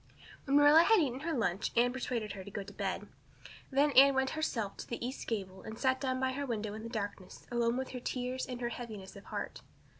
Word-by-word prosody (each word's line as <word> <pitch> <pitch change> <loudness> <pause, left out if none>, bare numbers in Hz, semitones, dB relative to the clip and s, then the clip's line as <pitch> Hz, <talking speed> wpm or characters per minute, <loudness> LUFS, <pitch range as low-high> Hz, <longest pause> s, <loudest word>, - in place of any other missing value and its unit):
When 280 0 +4
Marilla 290 +2 +8
had 445 +6 +5
eaten 265 -5 0
her 325 +3 -2
lunch 195 -3 0
Anne 245 +1 +4
persuaded 240 -4 -2
her 190 -1 -7
to 200 - -9
go 200 0 -4
to 200 +1 -11
bed. - - -3 0.6
Then 285 +2 +3
Anne 275 +1 +8
went 265 0 +2
herself 230 -10 -2
to - - -7
the 235 0 -4
east 260 - -6
gable 190 -4 -3
and 220 0 -8
sat 260 0 +1
down 260 -2 0
by 260 0 +1
her 280 +2 -3
window 215 -3 -2
in 215 - -6
the 230 - -6
darkness 205 -4 -5
alone 235 0 +1
with 260 0 -3
her 250 - -5
tears 250 +1 -3
and 250 -1 -6
her 240 - 0
heaviness 215 -6 -7
of 200 - -12
heart. - - -5
245 Hz, 235 wpm, -33 LUFS, 215-265 Hz, 0.6 s, Marilla